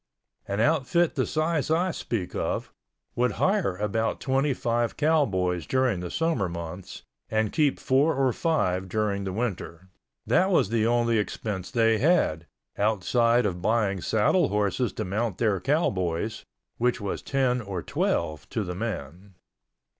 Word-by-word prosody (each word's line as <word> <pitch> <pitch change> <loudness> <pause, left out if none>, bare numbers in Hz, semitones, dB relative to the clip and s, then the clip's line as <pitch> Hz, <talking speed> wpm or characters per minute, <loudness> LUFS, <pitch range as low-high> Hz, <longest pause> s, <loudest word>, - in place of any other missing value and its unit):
An 100 +1 -2
outfit 160 +6 +2
the - - 0
size 155 -1 0
I 175 +4 +2
speak 110 - -4
of, - - -2 0.4
would 125 +1 +1
hire 190 - +1
about 105 +2 -1
twenty 135 +2 +1
five 120 -2 -1
cowboys 95 - +1
during 130 -7 +1
the 90 0 -5
summer 160 - 0
months 85 +2 -7 0.3
and 110 -1 0
keep 150 -3 +2
four 140 +5 +2
or 130 -2 +2
five 95 - 0
during 100 -1 -1
the 95 - -2
winter. 95 -4 -4 0.4
That 190 - +3
was 175 - +3
the 115 -1 +1
only 115 -1 +2
expense 100 -1 -4
they 115 -3 +2
had, 120 - +2 0.3
outside 115 +3 +2
of 90 -3 -2
buying 100 -2 +1
saddle 115 - +2
horses 105 +3 0
to - - -4
mount 105 +1 -2
their 105 -5 +1
cowboys—which 110 - -1
was 100 -2 -4
ten 130 -2 0
or 95 -6 -5
twelve 75 -1 -1
to 110 - -2
the 90 -2 -4
man. 95 -2 -6
110 Hz, 145 wpm, -26 LUFS, 95-130 Hz, 0.4 s, That